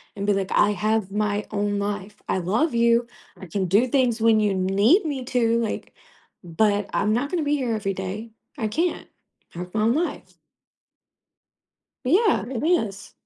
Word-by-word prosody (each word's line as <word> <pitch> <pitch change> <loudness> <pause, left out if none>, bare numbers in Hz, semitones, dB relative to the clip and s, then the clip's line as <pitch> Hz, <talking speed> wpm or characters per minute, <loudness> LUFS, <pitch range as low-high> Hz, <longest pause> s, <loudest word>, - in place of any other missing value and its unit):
and 200 - -4
be 205 - +4
like, 195 -1 -2
"I 210 0 +4
have 215 0 0
my 210 0 -1
own 205 0 -1
life. 205 0 -4
I 190 - 0
love 225 - 0
you. 235 0 +3 0.3
I 190 - -10
can 190 +3 -2
do 210 +8 +3
things 245 -3 +1
when 220 -1 +4
you 205 -2 +2
need 200 - +3
me 275 -4 -3
to, 235 -2 +1
like, 225 - -4 0.5
but 205 +4 0
I'm 210 +2 +1
not 265 +5 -1
going 360 - 0
to 295 - -2
be 290 - +2
here 250 -5 -1
every 195 -2 -2
day. 195 +5 -6 0.3
I 220 -4 -1
can't. 335 +10 -1 0.5
I 170 - -6
have 180 +2 -7
my 215 - +1
own 230 +2 +3
life." 340 +2 -3 1.7
Yeah, 395 - +3
it 260 -2 -4
is. 220 - 0
215 Hz, 180 wpm, -24 LUFS, 200-245 Hz, 1.7 s, be